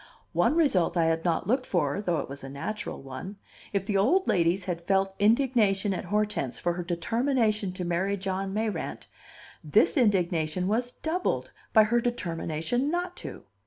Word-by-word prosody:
One - - +3
result 240 - +2
I 165 - +3
had 165 0 +1
not 170 -2 0
looked 255 +6 0
for, 165 0 0
though 175 -5 0
it - - -7
was 140 0 -8
a 135 - -7
natural 210 +7 -5
one: 135 +10 -7 0.4
if 200 -2 -1
the 205 -1 0
old 340 - +3
ladies 175 +2 +2
had 175 -3 -3
felt 195 0 +2
indignation 210 -3 +3
at 185 - -4
Hortense 210 -8 -1
for 175 - 0
her 175 +1 -4
determination 215 +3 0
to 180 -1 -4
marry 185 +4 0
John 190 0 -3
Mayrant, 215 +1 -3 0.6
this - - +3
indignation 180 - +1
was 240 +4 0
doubled 345 +3 -2 0.2
by 220 - +7
her 235 +3 +2
determination 185 - -1
not 355 +2 -2
to! - - -8
195 Hz, 165 wpm, -27 LUFS, 175-230 Hz, 0.6 s, by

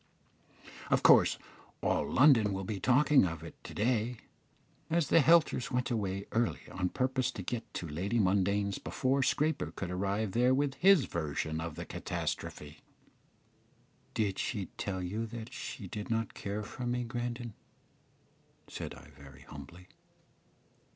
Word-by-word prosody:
Of - - +2
course - - +6 0.5
all - - +1
London 120 -7 +5
will 95 0 -3
be 100 +1 -4
talking 135 +6 +5
of 85 -3 -3
it 85 - -8
to - - -9
day, 115 +2 0 0.7
as 165 -2 +1
the - - +6
Helters 155 -4 +4
went 125 +1 -1
away 100 -3 -2
early 115 0 0
on 90 0 -1
purpose 130 +1 0
to 95 - -6
get 115 +2 -4
to 85 - -3
Lady 95 +10 -2
Mundane's 100 0 +1
before 135 +1 0
Scraper 150 - +1
could 90 +1 -5
arrive 100 +3 -1
there 125 +5 +3
with 140 0 +1
his 185 0 +5
version 80 0 -3
of 80 -2 -5
the - - -6
catastrophe." 75 0 -5 1.4
"Did 100 -3 0
she 105 -6 -2
tell 95 -2 -3
you 110 +5 -3 0.2
she 115 - -6
did 105 +3 -6
not 115 -1 -1
care 105 +1 -4
for 125 +4 -6
me, 125 0 0
Grandon?" 120 -1 -4 1.1
said - - -6
I, - - -14
very 70 -1 -14
humbly. 75 +6 -11
105 Hz, 145 wpm, -32 LUFS, 90-125 Hz, 1.4 s, course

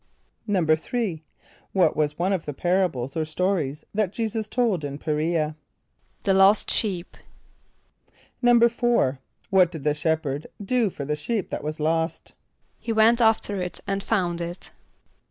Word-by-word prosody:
= - - -20
=3.= 175 +1 0 0.5
What 180 -5 +3
was 150 -1 0
one 185 +3 +1
of 180 -5 -3
the 145 - -4
parables 175 -7 0
or 160 - 0
stories 155 -3 -1
that 205 -3 0
J[=e]´[s+]us 220 -1 -3
told 220 -9 +1
in 140 -1 -4
P[+e] 155 - -4
r[=e]´a? 155 0 0 0.7
=The 195 - +3
Lost 195 +2 +5
Sheep.= 185 -5 -1 1.3
=4.= 235 - +3 0.3
What 185 -3 +5
did 160 -5 -7
the 150 0 +2
shepherd 155 -2 -1
do 225 +2 +1
for 145 -5 -6
the 150 +2 -1
sheep 195 +7 -3
that - - -4
was 155 +1 -4
lost? 160 +2 -1 0.5
=He 230 - -4
went 225 +2 +4
after 220 -3 +2
it 180 0 -3
and 200 0 -2
found 180 -5 -1
it. 170 +1 -7
180 Hz, 150 wpm, -24 LUFS, 155-210 Hz, 1.3 s, Lost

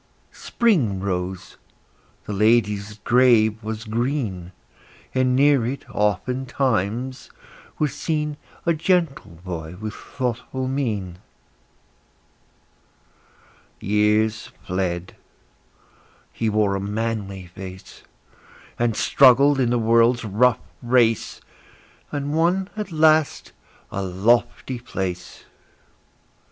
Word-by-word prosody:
Spring 150 - +1
rose; 95 -1 -4 0.7
the 105 - -4
lady's 105 -1 +1
grave 115 -3 +4
was 110 0 -5
green; 110 -6 -2 0.6
And 130 -1 +2
near 140 -2 +4
it, 130 +4 -4
oftentimes, 120 +2 -1 0.5
was 150 -3 0
seen 150 0 -2 0.3
A 170 - +3
gentle 165 -3 0 0.2
boy 85 -2 -6
with 110 0 -5
thoughtful 130 +1 -4
mien. 105 -10 -3 2.6
Years 105 +2 +1 0.2
fled; 90 -1 -3 1.2
he 115 - -1
wore 105 -2 +1
a - - -2
manly 100 -2 -3
face, 95 +1 -11 0.8
And 120 -2 +1
struggled 140 +3 +5
in 125 -3 +2
the 120 - +2
world's 115 +1 +3
rough 115 +4 +3 0.2
race, 120 -2 +1 0.7
And 145 0 -3
won 180 +4 +1
at 210 -3 -5
last 155 -1 +2 0.4
a 100 - -3
lofty 115 +6 0
place. 90 -6 -5
115 Hz, 90 wpm, -22 LUFS, 100-130 Hz, 2.6 s, struggled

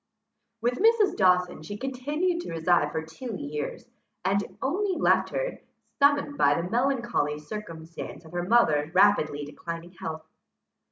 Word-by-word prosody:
With 245 +2 0
Mrs. 445 -2 +4
Dawson 180 -2 +3
she 205 +7 -7
continued 290 - -1
to - - -7
reside 165 -2 +2
for 160 - -2
two 200 +9 -7
years, 150 -4 -5 0.4
and 200 +2 0
only 370 +6 0
left - - +3
her, - - -3 0.4
summoned 285 0 +3
by 145 +2 +4
the 170 - -3
melancholy 235 - 0
circumstance 165 -1 -8
of 160 - -13
her 175 0 -2
mother's 160 -7 +3
rapidly 170 -7 +4
declining 165 +3 -7
health. 160 -3 -6
190 Hz, 135 wpm, -27 LUFS, 160-270 Hz, 0.4 s, Mrs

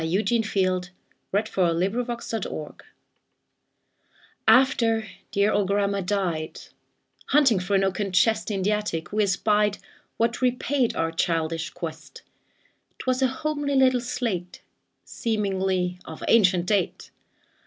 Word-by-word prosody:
Eugene 210 +8 +1
Field 185 -4 0 0.4
Little 200 -3 +1
Homer's 230 +8 -1
Slate 225 -4 -3 2.0
AFTER 230 -4 +4 0.2
dear 200 +1 +2
old 205 -2 +1
grandma 200 0 +1
died, 175 -5 -2 0.7
Hunting 265 -8 +4
through 190 +2 -1
an 195 - +3
oaken 195 +1 -1
chest 220 +5 +2
In 195 -3 -2
the 205 - +2
attic, 210 -5 -2
we 215 - +2
espied 210 +1 +2 0.4
What 230 +2 0
repaid 250 0 +1
our 165 0 0
childish 165 -1 -1
quest; 165 -3 -8 0.7
'Twas 255 0 -1
a 260 - +4
homely 290 +1 -2
little 260 -2 +4
slate, 220 -8 -4 0.4
Seemingly 190 -5 -1
of 160 - -9
ancient 185 -6 +4
date. 195 -2 -1
205 Hz, 115 wpm, -25 LUFS, 180-230 Hz, 2.0 s, AFTER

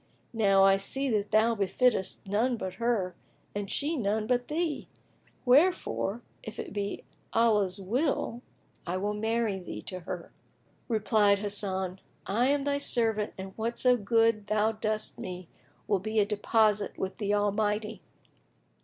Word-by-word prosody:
Now 195 -4 +4
I 195 0 +6
see 270 +7 -2
that 210 -2 0
thou 220 +2 +4
befittest 205 0 +1
none 230 +5 +1
but 190 -3 -4
her 215 -6 +1 0.4
and 205 -1 -4
she 295 +8 -1
none 215 -4 0
but 245 +1 0
thee; 315 0 -2 0.6
wherefore, 250 - +2 0.2
if 220 - -9
it - - -6
be 205 -1 -3 0.3
Allah's 210 -5 +2
will, 240 - -1 0.5
I 180 +2 -1
will 205 +2 -1
marry 220 -1 0
thee 180 - -7
to 185 - -6
her." 175 0 -7 0.6
Replied 215 -3 +3
Hasan, 195 -2 -1 0.3
"I 235 +6 +2
am 280 0 +2
thy 285 0 0
servant 225 -6 +1
and 190 0 -8
whatso 235 +3 +2
good 225 -1 +2
thou 215 +1 +2
dost 215 0 -3
with - - -7
me 180 -1 -7 0.4
will 200 -2 +2
be 215 +3 -4
a 210 - +5
deposit 210 0 +1
with 190 0 -4
the 205 -1 +1
Almighty!" 210 +1 0
215 Hz, 145 wpm, -29 LUFS, 200-235 Hz, 0.6 s, I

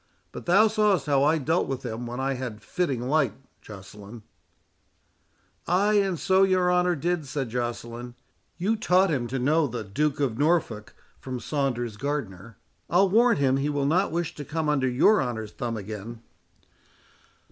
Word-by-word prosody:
But - - -9
thou 200 +5 +6
saw'st 210 -5 +2
how 140 -2 +2
I 155 +3 +3
dealt 160 +4 0
with 135 -1 -4
him 120 +1 -5
when 120 +2 -5
I 135 +1 0
had 125 -5 -6
fitting 135 -4 -2
light, 155 +3 +1 0.3
Joceline." 105 +2 -11 1.4
"Ay, 195 +5 +2
and 190 -3 -1
so 190 0 +3
your 185 -2 +3
honour 180 0 +2
did," 170 0 -2
said 135 -2 -3
Joceline. 120 0 -5 0.4
"You 195 +6 0
taught 190 -3 +2
him 125 -5 -1
to 130 +3 -3
know 150 +4 +2
the 120 -2 -5
Duke 140 +9 -1
of 130 -4 -1
Norfolk, 145 -9 0 0.2
from 130 -1 -6
Saunders 120 -6 -2
Gardner. 115 -7 -5 0.3
I'll 190 +3 +4
warrant 235 -2 +4
him 135 -1 +3
he 140 +2 -1
will 145 -1 -1
not 175 +6 +2
wish 170 0 -2
to 145 - -7
come 155 +1 -2
under 135 -3 +1
your 185 +12 +4
honour's 110 -4 -4
thumb 115 0 -4
again." 110 +3 -8
140 Hz, 165 wpm, -26 LUFS, 120-175 Hz, 1.4 s, thou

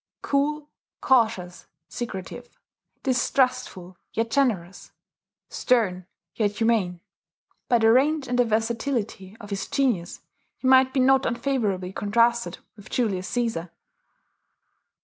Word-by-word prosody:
Cool, 295 +2 0 0.3
cautious, 220 -9 +1 0.2
secretive, 240 +1 -7 0.4
distrustful, 250 -8 0 0.2
yet 230 +1 -1
generous, 205 -10 -1 0.6
stern, 190 -8 0 0.3
yet 210 -2 0
humane, 215 -7 +1 0.7
by 240 - +5
the 225 -1 +4
range 280 +3 +2
and 245 0 -1
the - - +6
versatility 225 -2 -2
of 205 -1 -11
his 195 -1 -3
genius 235 -11 -1 0.4
he 260 - -3
might 260 0 +6
be 265 - 0
not 265 +1 +4
unfavourably 230 -7 -1
contrasted 235 +4 +1 0.2
with 205 -2 -14
Julius 195 -7 -1
Caesar. 225 -9 -2
230 Hz, 110 wpm, -25 LUFS, 195-255 Hz, 0.7 s, the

